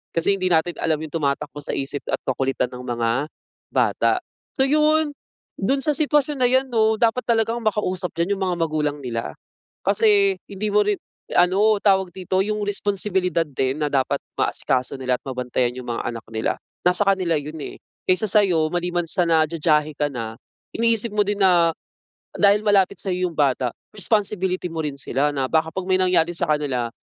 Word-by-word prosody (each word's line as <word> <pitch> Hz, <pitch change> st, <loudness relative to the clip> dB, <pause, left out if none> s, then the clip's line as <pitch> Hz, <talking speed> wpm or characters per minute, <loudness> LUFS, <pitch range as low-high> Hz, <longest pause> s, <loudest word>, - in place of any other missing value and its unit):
Kasi 165 Hz, +4 st, +2 dB
hindi 185 Hz, -1 st, -1 dB
natin 170 Hz, 0 st, +2 dB
alam 160 Hz, -1 st, +1 dB
yung 155 Hz, 0 st, -8 dB
tumatakbo 145 Hz, -2 st, -2 dB
sa -, -, -5 dB
isip 140 Hz, +1 st, -4 dB
at -, -, +1 dB
kakulitan 130 Hz, -1 st, -1 dB
ng 125 Hz, -, -7 dB
mga 120 Hz, -2 st, -1 dB, 0.6 s
bata. -, -, +2 dB, 0.5 s
So, 265 Hz, -, +3 dB
yun. 305 Hz, +1 st, +2 dB, 0.4 s
Dun 270 Hz, +8 st, 0 dB
sa 300 Hz, -, +3 dB
sitwasyon 295 Hz, 0 st, +1 dB
na 250 Hz, -, +4 dB
yan 260 Hz, +1 st, +3 dB
'no, 220 Hz, -1 st, +3 dB
dapat 230 Hz, +2 st, +2 dB
talagang 230 Hz, +1 st, +1 dB
makausap 190 Hz, -4 st, -1 dB
diyan 170 Hz, +4 st, +1 dB
yung -, -, -8 dB
mga 180 Hz, -, 0 dB
magulang 155 Hz, -3 st, -1 dB
nila. 115 Hz, -2 st, -4 dB, 0.5 s
Kasi 405 Hz, -3 st, +4 dB, 0.2 s
hindi 200 Hz, +2 st, -3 dB
mo 210 Hz, 0 st, +5 dB
rin 205 Hz, -1 st, +1 dB, 0.4 s
ano, 200 Hz, +5 st, +4 dB
tawag 190 Hz, -2 st, +4 dB
dito, 185 Hz, 0 st, -1 dB
yung 210 Hz, +1 st, -2 dB
responsibilidad 195 Hz, -3 st, 0 dB
din 135 Hz, -2 st, -2 dB
na -, -, +1 dB
dapat 135 Hz, -2 st, +1 dB, 0.2 s
maasikaso 130 Hz, 0 st, 0 dB
nila 130 Hz, -1 st, 0 dB
at -, -, -70 dB
mabantayan 125 Hz, -1 st, -1 dB
yung 125 Hz, -1 st, -8 dB
mga 115 Hz, -, -3 dB
anak 115 Hz, -1 st, -5 dB
nila 110 Hz, 0 st, -1 dB, 0.3 s
nasa 180 Hz, +3 st, +4 dB
kanila 185 Hz, -4 st, +2 dB
yun, 150 Hz, +2 st, -8 dB
eh. -, -, -7 dB, 0.3 s
Kaysa 185 Hz, +4 st, +3 dB
sa'yo, 180 Hz, -7 st, +3 dB
maliban 175 Hz, 0 st, -1 dB
sa 175 Hz, +1 st, +1 dB
na 160 Hz, -1 st, +4 dB
jajahe 155 Hz, -1 st, +1 dB
ka 145 Hz, +1 st, 0 dB
na, 115 Hz, -3 st, -5 dB, 0.4 s
iniisip 230 Hz, -1 st, +1 dB
mo 210 Hz, -, -3 dB
din 205 Hz, +1 st, -1 dB
na 175 Hz, -4 st, +4 dB, 0.7 s
dahil 205 Hz, 0 st, +4 dB
malapit 200 Hz, -2 st, +3 dB
sa'yo 185 Hz, -2 st, -1 dB
yung -, -, -11 dB
bata 130 Hz, -4 st, +1 dB, 0.2 s
,responsibility 195 Hz, -3 st, 0 dB
mo 165 Hz, -, -8 dB
rin 145 Hz, -, -3 dB
sila 140 Hz, +1 st, 0 dB
na 135 Hz, -2 st, -1 dB
baka 160 Hz, 0 st, +2 dB
'pag 190 Hz, -1 st, -4 dB
may 185 Hz, -, +4 dB
nangyari 175 Hz, -2 st, +2 dB
sa 175 Hz, -, 0 dB
kanila, 140 Hz, -6 st, 0 dB
180 Hz, 180 wpm, -22 LUFS, 145-210 Hz, 0.7 s, mo